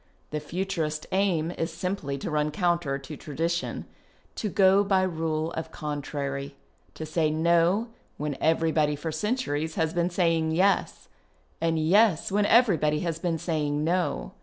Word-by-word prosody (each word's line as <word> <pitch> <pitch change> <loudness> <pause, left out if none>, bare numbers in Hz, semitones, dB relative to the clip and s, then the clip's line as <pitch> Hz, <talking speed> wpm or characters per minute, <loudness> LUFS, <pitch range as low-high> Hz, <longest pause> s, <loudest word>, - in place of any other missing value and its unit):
The 150 - -2
Futurist 160 -1 -3
aim 180 -4 +1
is 165 0 -1
simply 165 -4 -3
to 140 - -5
run 150 0 +1
counter 170 -3 0
to 135 +2 -9
tradition, 165 +5 -3 0.5
to 215 - -3
go 195 +1 +5
by 195 -2 +2
rule 160 -2 -1
of 160 - -5
contrary, 140 -1 -4 0.4
to 160 - -5
say 155 0 +1
No 170 +7 +2 0.3
when 150 -1 -3
every 160 0 +2
body 150 -2 +2
for 160 +3 -4
centuries 160 - -2
has 160 0 0
been 175 0 +1
saying 165 -3 +1
Yes, 190 +3 +1 0.5
and 165 0 +1
Yes 185 +3 +3
when 205 +1 +2
everybody 165 - +4
has 165 -2 -2
been 165 -1 -1
saying 150 -2 -1
No. 175 +2 -1
165 Hz, 150 wpm, -27 LUFS, 150-180 Hz, 0.5 s, go